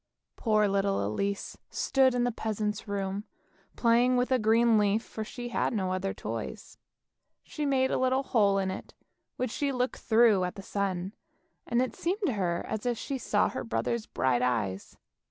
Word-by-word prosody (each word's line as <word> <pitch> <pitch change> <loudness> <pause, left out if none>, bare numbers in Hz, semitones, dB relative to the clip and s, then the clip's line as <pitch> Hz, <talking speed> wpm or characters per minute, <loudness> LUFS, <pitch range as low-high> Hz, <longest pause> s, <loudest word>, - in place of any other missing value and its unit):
Poor 215 -2 +2
little 195 - +1
Elise 200 - -3
stood 265 -2 +2
in 245 - +2
the 245 - +1
peasant's 215 -2 -3
room, 200 0 -2 0.5
playing 240 +2 +3
with 250 +1 0
a 260 - +4
green 225 +1 +4
leaf, 210 +2 +2
for 220 - -6
she 240 +3 -7
had - - 0
no 190 -4 -1
other 190 +1 -1
toys. - - -6 0.6
She 300 -2 -3
made 265 -1 +2
a - - +1
little 260 +1 +2
hole 205 -6 +3
in 190 -1 0
it, - - -8 0.4
which 255 -2 -2
she 285 0 -1
looked 250 0 -1
through 220 -4 +4
at 180 - -3
the 195 - -8
sun, 190 -1 -2 0.5
and 240 +1 +2
it 255 - -4
seemed 370 +6 -2
to 270 - +1
her 175 -4 -1
as 220 +2 -3
if 240 -1 0
she 275 +3 -4
saw 205 -3 +2
her - - -4
brothers' 115 - -2
bright 130 -2 +1
eyes. 110 -7 -1
215 Hz, 180 wpm, -29 LUFS, 195-245 Hz, 0.6 s, a